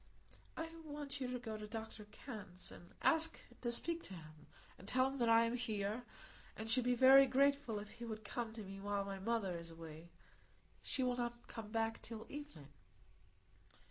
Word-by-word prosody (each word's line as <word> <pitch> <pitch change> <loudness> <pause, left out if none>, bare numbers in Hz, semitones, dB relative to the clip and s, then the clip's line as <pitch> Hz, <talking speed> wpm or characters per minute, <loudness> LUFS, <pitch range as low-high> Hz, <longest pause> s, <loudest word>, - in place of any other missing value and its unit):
"I 325 0 -3
want 290 -2 -5
you 255 - 0
to 250 - -1
go 225 -3 -5
to 210 0 -6
Dr 220 -1 -6
Kenn's, 205 -4 -7
and 175 - -13
ask 325 0 +5 0.2
to 240 - 0
speak 335 +8 +1
to 190 - -7
him, 155 -2 -12 0.3
and 190 - -12
tell 255 +3 +4
him 270 0 -4
that 235 -1 +3
I 230 0 +7
am 230 +1 0
here, 220 -1 -1 0.5
and 220 - -4
should 245 +2 +3
be 250 0 +4
very 270 +2 +9
grateful 275 -3 +3
if 205 0 -6
he 235 - -7
would 220 -1 -5
come 230 +1 -2
to 220 -1 -6
me 195 0 -7
while 200 0 -1
my 195 -1 -4
mother 200 -3 0
is 170 0 -5
away. 165 0 -9 0.7
She 260 - +1
will 250 -1 +1
not 240 0 -3
come 220 -2 -7
back 225 0 0
till 225 -1 -7
evening." 290 - -8
225 Hz, 190 wpm, -39 LUFS, 205-255 Hz, 0.7 s, very